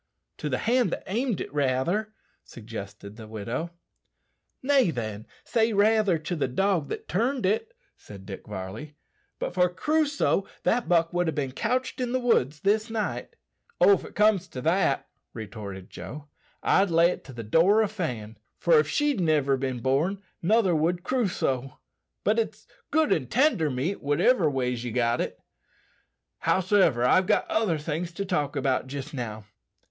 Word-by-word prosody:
"To 150 - -3
the 130 - 0
hand 240 -2 +2
that - - -4
aimed 230 +1 -1
it, - - -6
rather," 145 +10 0 0.3
suggested 105 -2 -9
the 110 -2 -10
widow. 115 +9 -4 0.9
"Nay, 270 -6 +4
then, 110 -7 -4 0.2
say 225 -1 +1
raither 210 -3 +3
to 160 +3 -4
the 150 - 0
dog 175 +3 0
that - - -5
turned 235 - 0
it," 325 - 0 0.2
said 100 -2 -12
Dick 95 -1 -9
Varley. 105 +9 -7 0.4
"But - - -4
for 180 0 +3
Crusoe, 290 - +1 0.2
that 240 0 +1
buck 165 -1 +3
would 175 -1 +1
ha' - - -4
bin 135 -3 -2
couched 255 - -1
in 245 -1 -1
the 255 - +2
woods 155 - +1
this 215 +3 +1
night." 205 - -3 0.4
"Oh! 180 +3 +7
if 200 - +3
it - - -11
comes 210 -3 +3
to 125 - -7
that," 175 +7 +1 0.3
retorted 100 -4 -8
Joe, 145 +12 -9 0.3
"I'd 195 0 +3
lay 170 +1 +4
it - - -7
to - - -10
the 115 -1 -6
door 180 - +4
o' - - +1
Fan, 120 - -5 0.2
for 165 -3 +4
if 150 - +1
she'd 290 - +1
niver 150 -5 +2
bin 130 -2 -3
born 160 +10 0 0.2
nother 200 0 +3
would 170 +3 0
Crusoe. 175 - -1 0.5
But 215 +2 +2
it's 225 - -3 0.2
good 315 0 +3
an' 130 -6 -1
tender 240 - +2
meat, 140 +9 -2
whativer 160 - +3
ways 125 -3 -1
ye 125 - -3
got 120 0 +1
it. - - -4 1.0
Howsiver, 185 - +3
I've 185 +9 +4
other 210 -5 +1
things 160 +3 -3
to 200 +3 -3
talk 150 -7 -1
about 135 -2 0
jist 140 +3 -6
now. 110 -5 -5
165 Hz, 165 wpm, -26 LUFS, 130-210 Hz, 1.0 s, Oh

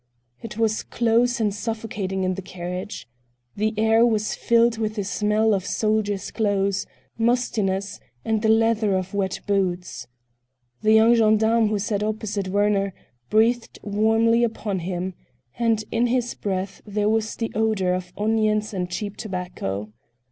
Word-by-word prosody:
It 225 -1 -8
was 220 -1 +1
close 235 +1 +1
and 210 -3 +1
suffocating 210 -3 -3
in 185 0 +1
the 195 - -5
carriage. 180 - -6 0.5
The 215 +1 0
air 225 +1 +4
was 215 -3 +1
filled 235 -1 +2
with 215 -1 -1
the 205 - -2
smell 210 +3 +1
of 195 -2 0
soldiers' 210 -1 -1
clothes, 200 -2 0 0.3
mustiness, 215 -5 0 0.3
and 220 -1 +1
the 220 - +2
leather 220 -3 +3
of 185 +1 -4
wet 195 -2 -1
boots. 185 -3 -1 0.7
The 215 0 +4
young 220 +2 +6
gendarme 220 0 +4
who 210 0 0
sat 205 0 -1
opposite 215 -2 -2
Werner 200 0 +1 0.3
breathed 230 +2 +2
warmly 225 +3 +3
upon 215 -4 -2
him, 180 +1 -3 0.5
and 225 -2 +2
in 235 +2 +2
his 245 0 0
breath 190 -1 -4
there 210 0 -1
was 220 0 0
the 225 - -3
odor 215 -4 +1
of 180 -1 -4
onions 215 0 +1
and 180 -2 -2
cheap 205 +3 -4
tobacco. 175 - -4
215 Hz, 145 wpm, -23 LUFS, 195-225 Hz, 0.7 s, young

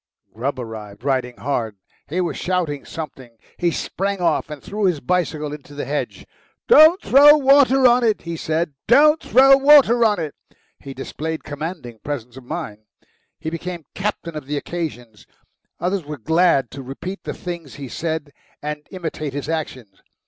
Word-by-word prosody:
Grubb 130 +6 -3
arrived, 110 -3 -8
riding 130 -3 -1
hard. 115 -6 -3 0.3
He 170 +5 -2
was 170 -5 -2
shouting 175 -6 -2
something. 130 -7 -8 0.2
He 175 - +1
sprang 195 +3 -3
off 170 -3 0
and 150 -1 -7
threw 210 0 -2
his 175 -5 +1
bicycle 155 -1 -1
into 145 -1 -11
the 145 - -4
hedge. 145 +3 -4 0.4
"Don't 335 -4 +8
throw 290 +3 +7
water 270 -1 +5
on 245 0 +5
it!" 220 -2 +1
he 170 0 -5
said 160 0 -2
"don't 300 +5 +5
throw 270 +2 +6
water 275 -4 +6
on 210 -4 +3
it!" 155 -3 -4 0.5
He 135 -1 -9
displayed 160 +4 -5
commanding 145 -6 -6
presence 125 -2 -6
of 130 -2 -12
mind. 105 -3 -5 0.6
He 160 - -5
became 170 -1 -6
captain 190 -4 -4
of 150 -3 -7
the 145 0 -2
occasion. 145 -9 -5 0.7
Others 185 +1 -1
were 150 0 -7
glad 160 -1 +2
to 135 - -8
repeat 140 +9 -7
the - - -5
things 170 -6 -7
he 140 -1 -7
said 160 +2 -4 0.3
and 150 0 -6
imitate 160 -6 -5
his 145 +1 -5
actions. 130 -11 -5
160 Hz, 165 wpm, -21 LUFS, 140-185 Hz, 0.7 s, Don't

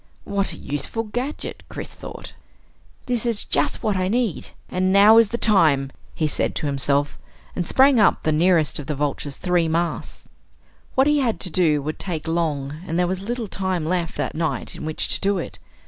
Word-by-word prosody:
What 200 -1 -1
a - - -8
useful 145 +11 -3
gadget! 245 +7 -4
Chris - - -7
thought. - - -9 0.7
This 245 -3 -1
is 230 -3 -1
just - - 0
what 210 -2 +1
I 185 0 0
need 225 -3 -1 0.2
and 185 +1 0
now 205 +3 +7
is 230 -3 +4
the 235 - -2
time! 155 - +3 0.2
he 155 - 0
said 150 - +1
to - - -3
himself, 140 0 0 0.4
and 175 -2 -2
sprang 265 -1 +5
up 210 - +3
the 155 - +1
nearest 160 -2 +2
of 140 - -7
the 150 - -2
Vulture's 145 0 -3
three 175 -2 +1
masts. 170 +2 -3 0.7
What 265 - +4
he 295 0 +3
had 240 -5 0
to 180 - -3
do 155 -5 +2
would 155 +2 -4
take 165 -4 -4
long, 155 -3 -2
and 165 - -2
there 180 - +3
was 185 +1 -2
little 235 +3 -3
time 190 -4 -2
left 175 0 -2
that - - -2
night 160 0 -2
in - - -7
which 155 0 0
to - - +1
do 200 0 +1
it. 175 - -6
180 Hz, 195 wpm, -22 LUFS, 155-210 Hz, 0.7 s, now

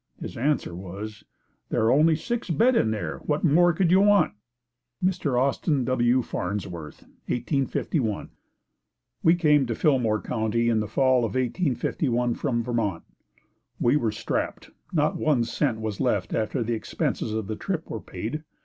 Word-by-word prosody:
His - - -7
answer 140 - 0
was, 100 +4 -7 0.5
"There - - +1
are 115 - +4
only 155 +3 +5
six 235 +7 -3
beds 235 - +3
in 110 - +3
there, 85 -11 -3
what 150 - -2
more 175 +2 +5
could 170 +1 +1
you 185 - +6
want?" 205 - +4 0.7
Mr. 150 -9 +1
Austin 140 0 +1
W. 125 0 +2
Farnsworth 90 -7 -5 0.2
1851. 125 - -1 0.9
We 165 +2 +5
came 150 -6 +3
to 115 - -2
Fillmore 120 -7 +2
County 115 +1 0
in 115 -2 +2
the 105 - -2
Fall 130 +3 +3
of 115 0 -2
1851 125 -2 0
from 120 -4 -1
Vermont. 110 -8 -1 0.8
We 120 +4 +3
were 120 -7 +1
strapped. 110 +1 -3 0.2
Not 150 -3 +1
one 145 -6 +2
cent 120 0 -1
was 110 -2 -4
left 105 -8 0
after 115 +3 -1
the 115 +1 -1
expenses 110 -1 -2
of 110 -1 -2
the 110 +2 -4
trip 170 - -3
were - - -5
paid. 155 0 -5
125 Hz, 155 wpm, -25 LUFS, 110-150 Hz, 0.9 s, you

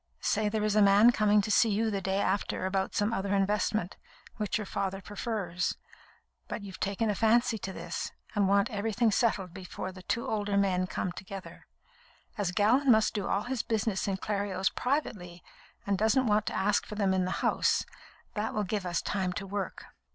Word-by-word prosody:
Say 210 0 +1
there 215 0 -1
is 215 -1 +1
a 215 - +5
man 205 +4 +7
coming 210 -2 +3
to 215 - -2
see 225 - +5
you 220 +2 +1
the 200 -1 -2
day 190 +1 -1
after 195 -1 0
about 190 0 -1
some 205 +2 +1
other 200 0 0
investment, 205 -1 0 0.4
which 210 0 -1
your 215 - -4
father 195 0 -2
prefers, 200 -3 -3 0.7
but 215 - -5
you've 195 -2 -9
taken 205 +3 0
a - - 0
fancy 225 +2 +2
to 195 - -5
this, 170 -1 -5 0.2
and 205 -2 +2
want 200 0 +3
everything 220 +2 +1
settled 195 -5 +1
before 185 0 -6
the 185 0 -11
two 230 +5 -2
older 205 -2 0
men 185 -2 +2
come 185 - -2
together. 195 +1 -9 0.7
As 205 -5 -1
Gallon 225 +9 +3
must 220 -2 +5
do 205 -2 -2
all 205 - 0
his 245 -1 -2
business 220 -3 -1
in 195 -1 0
Clerios 200 -2 -1
privately, 205 - -2 0.4
and 200 -1 0
doesn't 220 +5 +3
want 210 -1 +2
to - - -2
ask 205 +1 +2
for 210 - -8
them 200 -2 +1
in 185 -1 +1
the 185 - -3
House, - - +2 0.5
that 215 +1 -2
will 210 - +1
give 200 -1 -2
us 175 -1 -1
time 190 -2 -1
to 195 - -5
work." 195 -1 -4
205 Hz, 195 wpm, -30 LUFS, 190-215 Hz, 0.7 s, man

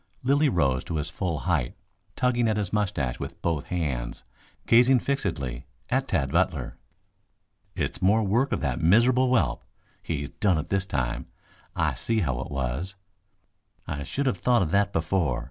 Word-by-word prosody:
Lilly 140 +3 +3
rose 70 - +1
to 85 - -4
his 75 +1 -2
full 85 -6 -2
height, 80 -9 0 0.4
tugging 120 -2 +2
at 110 -1 +1
his 105 -3 -2
moustache 90 - -1
with - - -6
both 80 -4 -1
hands, 70 -9 -3 0.4
gazing 125 +3 +6
fixedly 85 - -2 0.2
at - - +1
Tad 65 0 0
Butler. - - 0 1.0
"It's - - -3
more 105 +4 +4
work 120 +7 +1
of - - -1
that 80 - -1
miserable 120 +9 +4
whelp. 85 - +1 0.4
He's 70 -4 -3
done 95 -5 +1
it 80 +2 -4
this 95 0 0
time. 65 -9 -2 0.5
I - - +1
see 115 -1 -1
how 65 -8 -1
it - - -6
was. 70 +8 -3 0.9
I 70 - -4
should 140 - -2
have 115 -9 0
thought 120 +1 +3
of 80 - -3
that 100 0 +2
before. 80 -6 0
90 Hz, 165 wpm, -26 LUFS, 70-115 Hz, 1.0 s, gazing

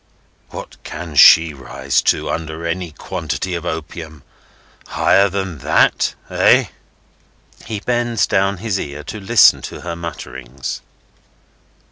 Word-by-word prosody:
What - - -10
can 85 -4 -7
she 80 +3 +7
rise 65 -1 -1
to, - - 0
under 80 0 -4
any 85 0 -3
quantity 90 +4 -4
of 85 0 -4
opium, 80 -2 -6 0.6
higher 100 +1 +3
than 95 -5 -4
that!—Eh?" - - +2 1.0
He 110 -2 -4
bends 120 -2 0
down 95 0 +1
his 100 0 -2
ear, 70 +1 -6
to 110 - -7
listen 110 +4 +5
to - - -8
her 85 -1 -5
mutterings. 65 -6 -7
85 Hz, 115 wpm, -18 LUFS, 80-100 Hz, 1.0 s, she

